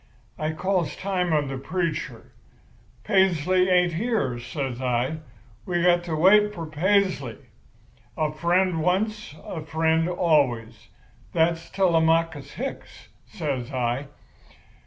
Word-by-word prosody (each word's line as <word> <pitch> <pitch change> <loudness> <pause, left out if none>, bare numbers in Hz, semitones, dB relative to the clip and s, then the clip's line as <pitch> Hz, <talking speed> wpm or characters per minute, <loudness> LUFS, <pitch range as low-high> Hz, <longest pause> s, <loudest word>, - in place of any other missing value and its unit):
I 155 +1 -1
calls 175 -2 -1
time 185 -3 -1
on 150 -2 +1
the 135 -1 -4
preacher. 165 +2 -3 0.7
'Paisley 185 -2 +2
ain't 180 -1 +3
here,' 165 - -1
says 130 -1 -4
I. 125 +4 0 0.5
'We've 175 -1 0
got 175 -1 +4
to 165 -2 -2
wait 210 +5 +5
for 165 - -5
Paisley. 165 - 0 0.8
A 155 -1 0
friend 170 +2 +1
once, 200 +1 -1
a 165 - -5
friend 160 +2 +1
always—that's 155 +2 -1
Telemachus 165 -4 +1
Hicks,' 270 +3 -7 0.2
says 140 - -4
I. 125 +2 -1
165 Hz, 110 wpm, -25 LUFS, 145-185 Hz, 0.8 s, wait